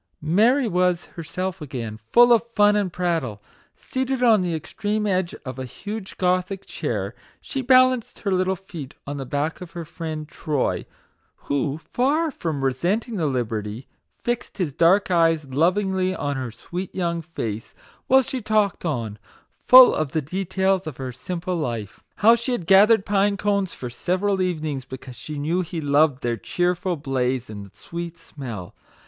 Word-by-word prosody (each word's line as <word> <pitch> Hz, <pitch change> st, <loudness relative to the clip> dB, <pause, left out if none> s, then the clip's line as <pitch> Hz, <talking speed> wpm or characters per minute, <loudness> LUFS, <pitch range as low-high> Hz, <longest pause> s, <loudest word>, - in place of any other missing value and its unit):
Mary 230 Hz, -, +3 dB
was 180 Hz, -2 st, +1 dB
herself 180 Hz, +2 st, -4 dB
again, 120 Hz, -7 st, -5 dB
full 240 Hz, 0 st, +7 dB
of 230 Hz, -, +5 dB
fun 205 Hz, -1 st, +5 dB
and 200 Hz, -3 st, 0 dB
prattle. 165 Hz, -, -1 dB, 0.4 s
Seated 260 Hz, -1 st, -2 dB
on 225 Hz, -5 st, +6 dB
the 175 Hz, -2 st, -1 dB
extreme 210 Hz, +7 st, -2 dB
edge 185 Hz, -3 st, 0 dB
of 130 Hz, 0 st, -6 dB
a -, -, -3 dB
huge 205 Hz, -, -7 dB
Gothic 185 Hz, +1 st, 0 dB
chair, -, -, -3 dB, 0.3 s
she 270 Hz, -, -4 dB
balanced 255 Hz, -2 st, +3 dB
her 200 Hz, -, -1 dB
little 185 Hz, 0 st, +1 dB
feet 170 Hz, -7 st, -9 dB
on 145 Hz, +1 st, -5 dB
the 135 Hz, -2 st, -5 dB
back 145 Hz, +6 st, -2 dB
of 175 Hz, -2 st, -9 dB
her 170 Hz, -1 st, -5 dB
friend 155 Hz, -1 st, -6 dB
Troy, 150 Hz, -2 st, -2 dB, 0.5 s
who, 140 Hz, 0 st, -2 dB
far 290 Hz, -, 0 dB
from 160 Hz, -, -3 dB
resenting 190 Hz, -, 0 dB
the 160 Hz, -4 st, +1 dB
liberty, 115 Hz, -2 st, -3 dB, 0.3 s
fixed 240 Hz, 0 st, -3 dB
his 170 Hz, -8 st, -1 dB
dark 185 Hz, +6 st, +4 dB
eyes 165 Hz, -3 st, +3 dB
lovingly 185 Hz, +5 st, +1 dB
on 145 Hz, -4 st, -2 dB
her 130 Hz, -2 st, -3 dB
sweet 175 Hz, -, -7 dB
young 170 Hz, -2 st, -1 dB
face, 115 Hz, -10 st, -5 dB, 0.3 s
while 265 Hz, 0 st, +6 dB
she 255 Hz, +1 st, -4 dB
talked 215 Hz, -2 st, +1 dB
on, 115 Hz, -, -3 dB, 0.3 s
full 255 Hz, 0 st, +8 dB
of 155 Hz, -4 st, -2 dB
the 160 Hz, -, +1 dB
details 190 Hz, +3 st, 0 dB
of 150 Hz, -, -6 dB
her 130 Hz, -1 st, -4 dB
simple 180 Hz, +6 st, -4 dB
life. 115 Hz, -9 st, -4 dB
How 225 Hz, +2 st, +6 dB
she 235 Hz, +2 st, -2 dB
had 190 Hz, -9 st, -3 dB
gathered 200 Hz, +3 st, +6 dB
pine 200 Hz, 0 st, +2 dB
cones 200 Hz, -2 st, 0 dB
for 125 Hz, -2 st, -6 dB
several 185 Hz, +7 st, 0 dB
evenings, 155 Hz, -7 st, -2 dB
be 130 Hz, -, -8 dB
cause 125 Hz, -1 st, -11 dB
she 150 Hz, +3 st, -7 dB
knew 160 Hz, +6 st, 0 dB
he 170 Hz, -1 st, -5 dB
loved 145 Hz, -2 st, +2 dB
their 120 Hz, -1 st, 0 dB
cheerful 180 Hz, -, -1 dB
blaze 130 Hz, -5 st, -1 dB
and 100 Hz, -2 st, -8 dB
sweet 170 Hz, 0 st, -7 dB
smell. 125 Hz, -, -8 dB
175 Hz, 165 wpm, -23 LUFS, 140-200 Hz, 0.5 s, full